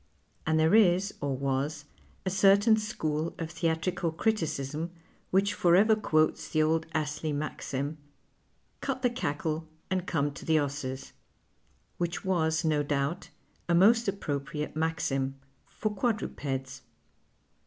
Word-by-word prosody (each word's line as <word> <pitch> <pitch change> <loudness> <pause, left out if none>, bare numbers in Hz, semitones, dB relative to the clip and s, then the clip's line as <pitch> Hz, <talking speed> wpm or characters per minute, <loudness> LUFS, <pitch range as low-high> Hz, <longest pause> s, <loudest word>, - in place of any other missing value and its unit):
And 160 0 +3
there 160 +3 +4
is, 195 -2 +4
or 140 -2 -1
was, 140 +2 -1 0.4
a 185 - 0
certain 200 +3 +5
sciiool 165 -7 -2
of 165 -1 -4
theatrical 165 0 -1
criticism 160 -5 -1 0.4
which 195 +2 +2
forever 195 +6 +5
quotes 155 -7 +1
the 155 -1 +2
old 160 +1 +1
Astlcy 150 0 -1
maxim, 145 0 -3 0.4
" - - -42
Cut 265 -1 -3
the 245 - +3
cackle 160 - -2 0.2
and 185 -1 -1
come 145 -3 0
to - - -10
the 160 -1 +3
'esses 140 -2 -3 0.3
" - - -42
— - - -39
which 175 +2 -2
was 160 -3 +1
no 155 -2 +2
doubt 145 +4 -1 0.4
a 170 - +4
most 225 +6 +5
approi)riate 150 -6 -3
maxim, 135 -4 -1 0.3
for 215 -1 -3
quadrujx'ds. 135 - -2
160 Hz, 130 wpm, -29 LUFS, 145-190 Hz, 0.4 s, certain